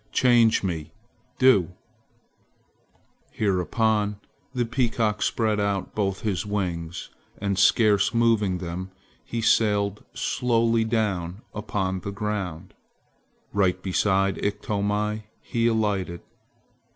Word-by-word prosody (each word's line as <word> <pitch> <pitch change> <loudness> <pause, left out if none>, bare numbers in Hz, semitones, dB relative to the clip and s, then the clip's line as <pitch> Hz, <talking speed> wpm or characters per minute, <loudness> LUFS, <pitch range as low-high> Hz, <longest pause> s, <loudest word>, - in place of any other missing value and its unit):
Change 120 -4 +4
me! 80 -4 -3 0.5
Do!" 100 -9 +4 1.6
Hereupon 105 +2 0 0.3
the 125 -2 -1
peacock 115 -3 0
spread 110 -2 +1
out 100 -1 -1
both 100 -2 -1
his 95 -5 -1
wings, 90 -4 -3 0.3
and 100 -1 -1
scarce 105 -1 +4
moving 115 -5 +2
them, 90 +1 -5 0.3
he 115 - -4
sailed 105 -2 +2
slowly 115 -2 +1
down 105 -5 -1
upon 100 -3 -2
the 95 - -6
ground. 100 -4 -4 0.8
Right 95 -2 +2
beside 95 +1 +1
Iktomi 105 +1 -1
he 115 0 0
alighted. 105 -6 0
105 Hz, 95 wpm, -25 LUFS, 95-110 Hz, 1.6 s, Change